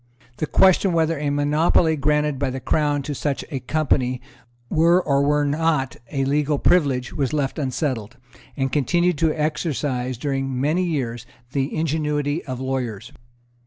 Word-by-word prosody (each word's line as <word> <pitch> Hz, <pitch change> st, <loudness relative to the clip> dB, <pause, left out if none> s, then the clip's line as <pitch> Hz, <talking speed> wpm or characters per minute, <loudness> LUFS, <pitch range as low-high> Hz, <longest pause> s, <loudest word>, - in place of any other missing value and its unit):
The 155 Hz, -, -2 dB
question 190 Hz, +1 st, +4 dB
whether 165 Hz, -2 st, +1 dB
a 145 Hz, -1 st, -1 dB
monopoly 150 Hz, +3 st, +2 dB
granted 150 Hz, -1 st, +1 dB
by 140 Hz, -2 st, 0 dB
the 130 Hz, +1 st, -4 dB
Crown 145 Hz, +2 st, 0 dB
to 145 Hz, -, -4 dB
such 140 Hz, 0 st, -2 dB
a 135 Hz, -, -2 dB
company 130 Hz, -2 st, 0 dB, 0.5 s
were 170 Hz, +4 st, +4 dB
or 140 Hz, -6 st, +1 dB
were 145 Hz, +1 st, +2 dB
not 145 Hz, -3 st, 0 dB
a 135 Hz, -1 st, 0 dB
legal 145 Hz, +1 st, +1 dB
privilege 135 Hz, -7 st, +2 dB
was 140 Hz, 0 st, -1 dB
left 145 Hz, 0 st, -1 dB
unsettled, 130 Hz, -4 st, -2 dB, 0.4 s
and 135 Hz, -1 st, -1 dB
continued 170 Hz, +3 st, +1 dB
to 160 Hz, -1 st, +3 dB
exercise, 150 Hz, -5 st, -2 dB
during 135 Hz, -1 st, -2 dB
many 155 Hz, +7 st, +1 dB
years, 120 Hz, -9 st, -3 dB, 0.2 s
the 135 Hz, 0 st, -1 dB
ingenuity 150 Hz, -1 st, -1 dB
of 130 Hz, -3 st, -5 dB
lawyers. 125 Hz, -5 st, -3 dB
145 Hz, 150 wpm, -22 LUFS, 135-155 Hz, 0.5 s, question